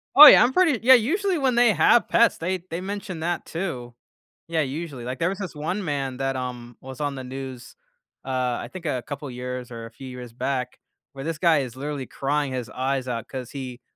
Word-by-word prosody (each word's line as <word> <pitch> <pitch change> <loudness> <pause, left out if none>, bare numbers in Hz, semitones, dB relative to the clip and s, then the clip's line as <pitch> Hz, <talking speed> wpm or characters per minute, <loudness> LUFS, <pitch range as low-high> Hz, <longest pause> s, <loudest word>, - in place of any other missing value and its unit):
Oh, 295 - +13
yeah, - - +9
I'm 250 +2 +2
pretty 330 -10 +3
yeah, 260 - +9
usually 360 - +2
when 265 -4 +1
they 240 -3 +5
have 175 +8 +4
pets, 235 - +4
they 185 +2 -2
they 170 +2 -4
mentioned 190 -4 -5
that 175 0 -2
too. 135 -9 -5 0.5
Yeah, 165 -1 0
usually, 140 -2 -5
like, 125 +1 -5
there 165 - +2
was 195 +1 -5
this 185 -4 -5
one 180 +7 -3
man 135 -3 -2
that, 135 0 -1
um, 120 -2 -6
was 130 +1 -9
on 145 -1 -1
the 130 - -6
news, 130 -1 -8 0.5
uh, - - -7 0.3
I 120 - -7
think 175 0 -9
a 130 -5 -1
couple 145 0 -6
years 125 0 -6
or 115 -1 -7
a 115 - -11
few 130 +3 -11
years 125 -2 -8
back, 125 0 -3 0.4
where 135 +1 -7
this 165 -1 -2
guy 165 -4 +4
is 130 -3 -4
literally 140 -1 -4
crying 140 0 -1
his 125 -3 -4
eyes 130 +2 -2
out 120 0 -4
'cause 130 -3 -7
he 130 -3 -7
140 Hz, 220 wpm, -24 LUFS, 125-175 Hz, 0.5 s, Oh